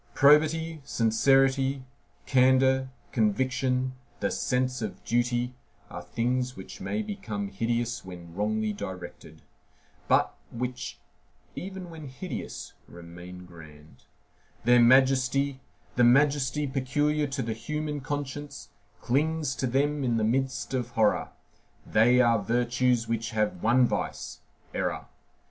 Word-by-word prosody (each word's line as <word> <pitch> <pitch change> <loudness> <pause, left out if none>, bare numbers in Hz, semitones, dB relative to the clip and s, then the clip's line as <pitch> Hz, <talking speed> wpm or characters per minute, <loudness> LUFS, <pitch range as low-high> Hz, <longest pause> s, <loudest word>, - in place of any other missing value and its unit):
Probity, 155 +2 +4
sincerity, 135 +2 +2 0.4
candor, 130 0 +4 0.2
conviction, 130 +3 +1 0.3
the 100 - 0
sense 125 0 0
of 110 - -5
duty, 120 +1 0 0.4
are 90 - -6
things 125 +7 -1
which 95 - -10
may 215 0 -2
become 110 - -4
hideous 115 +3 -2
when 90 -2 -10
wrongly 105 +2 -1
directed; 95 -3 -8 0.6
but - - +3 0.2
which, 125 +1 -4 0.6
even 190 -2 -7
when 160 -3 -9
hideous, 135 +8 -7
remain 90 +1 -11
grand: 80 -3 -15 0.6
their 120 +1 +5
majesty, 135 +2 +4 0.4
the 120 - +5
majesty 140 +3 +3
peculiar 145 +3 0
to 135 -1 -3
the 115 0 -2
human 150 +5 -4
conscience, 145 +1 -5 0.3
clings 150 +2 0
to 130 - -1
them 140 +3 +1
in 120 -3 +1
the 110 - +1
midst 130 +3 -1
of 125 -2 -1
horror; 110 -3 +1 0.6
they 120 +4 +4
are 115 -3 +4
virtues 120 +2 +1
which 115 0 -2
have 105 -5 -1
one 120 +3 +4
vice,—error. - - -4
125 Hz, 115 wpm, -27 LUFS, 115-140 Hz, 0.6 s, their